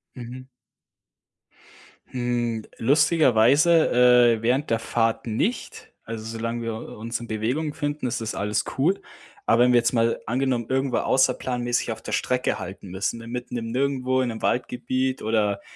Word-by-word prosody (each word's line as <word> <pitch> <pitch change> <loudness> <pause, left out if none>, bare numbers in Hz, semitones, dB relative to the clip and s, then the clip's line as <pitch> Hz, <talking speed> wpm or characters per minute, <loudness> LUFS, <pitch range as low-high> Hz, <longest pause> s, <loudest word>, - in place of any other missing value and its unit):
Mhm. 125 +1 -8 1.6
Hm. 120 -3 -2
Lustigerweise, 150 +2 +4 0.5
äh, - - -10
während 125 +4 +1
der 115 0 +1
Fahrt 115 0 0
nicht. 155 - -3
Also, 110 -1 -6
solange 115 +1 -4
wir 115 -1 -3
u - - -8
uns 115 +2 -4
in 120 - -8
Bewegung 125 +8 -2
befinden, 145 -2 -3
ist 120 -1 -3
das 110 - -4
alles 105 +1 -1
cool. 175 +9 +2 0.5
Aber 120 +2 +5
wenn 125 0 +4
wir 120 - +6
jetzt 120 +1 0
mal 115 0 +1
angenommen, 125 -1 0
irgendwo 135 -1 0
außerplanmäßig 125 -3 +1
auf 110 - -6
der - - -7
Strecke 125 0 0
halten 95 0 -8
müssen, 95 +5 -2
ne, 115 - -10
mitten 125 0 -5
im 115 -1 -4
Nirgendwo, 130 0 0
in 125 - -1
'nem 110 - -6
Waldgebiet 130 +1 -1
oder, 105 -2 0
120 Hz, 155 wpm, -24 LUFS, 115-130 Hz, 1.6 s, wir